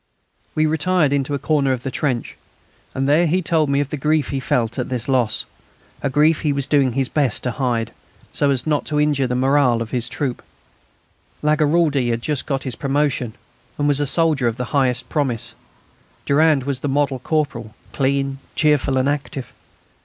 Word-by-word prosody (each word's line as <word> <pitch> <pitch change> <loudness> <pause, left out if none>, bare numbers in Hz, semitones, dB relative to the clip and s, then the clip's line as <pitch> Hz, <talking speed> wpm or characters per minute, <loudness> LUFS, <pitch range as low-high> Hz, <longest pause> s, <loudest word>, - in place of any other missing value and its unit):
We 155 - +3
retired 155 -1 +2
into 140 0 0
a - - 0
corner 140 -1 +1
of 125 -1 -5
the 135 - -3
trench, 125 -3 -2 0.6
and 135 +1 0
there 160 +4 +4
he 180 +4 +1
told 155 -2 +1
me 140 0 +2
of 145 - -3
the 150 - -4
grief 150 0 +1
he 135 - -2
felt 120 -2 -1
at - - -3
this 125 -2 -3
loss, 125 -5 +1 0.6
a 140 - 0
grief 150 +4 +3
he 150 - +1
was 140 -1 0
doing 135 -3 +2
his 135 0 0
best 140 -6 0
to 125 - -1
hide, 120 -2 -1 0.4
so 145 - +1
as 130 -3 +1
not 150 -2 +1
to 150 -1 -1
injure 145 -3 +2
the 125 - -2
moral 130 -2 +3
of 115 -1 -5
his 120 -2 -1
troop. 130 -1 -3 1.0
Lagaraldi 150 -3 +2
had 115 0 -2
just 150 -3 -2
got 135 -2 -1
his 130 - -3
promotion, 140 -5 -1 0.4
and 145 - +1
was 145 -1 +2
a 145 - +1
soldier 155 -5 +2
of 115 - -1
the 125 - -3
highest 125 -3 +1
promise; 135 -7 -1 0.7
Durand 150 -1 +3
was 135 -1 -2
the 145 - -3
model 135 -1 0
corporal, 125 -7 -2 0.2
clean, 135 0 0 0.2
cheerful, 145 -3 +2
and 130 +1 +2
active. 140 -2 -3
140 Hz, 190 wpm, -20 LUFS, 125-150 Hz, 1.0 s, there